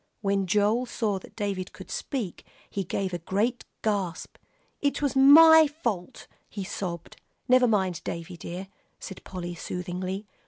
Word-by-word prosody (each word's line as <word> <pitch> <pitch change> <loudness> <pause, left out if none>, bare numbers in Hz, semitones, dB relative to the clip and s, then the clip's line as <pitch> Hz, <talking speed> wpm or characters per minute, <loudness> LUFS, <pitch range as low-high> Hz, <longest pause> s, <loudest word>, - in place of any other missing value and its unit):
When 195 -2 0
Joel 210 +6 +2
saw 210 -5 -1
that - - -16
David 200 -3 -3
could - - -11
speak, 235 - -4 0.2
he 200 - -3
gave 190 +1 -3
a 175 - -2
great 210 +8 -1 0.2
gasp. 200 -5 -2 0.4
"It 285 -1 0
was 285 -2 0
my 315 +4 +9
fault," 235 - -4 0.2
he 200 - -5
sobbed. 175 -3 -5 0.3
"Never 255 0 +5
mind, 190 -6 +1
Davie 170 +1 -6
dear," 180 +3 -7 0.3
said 190 - -9
Polly, 175 -2 -6
soothingly. 180 +3 -4
195 Hz, 145 wpm, -27 LUFS, 180-240 Hz, 0.4 s, my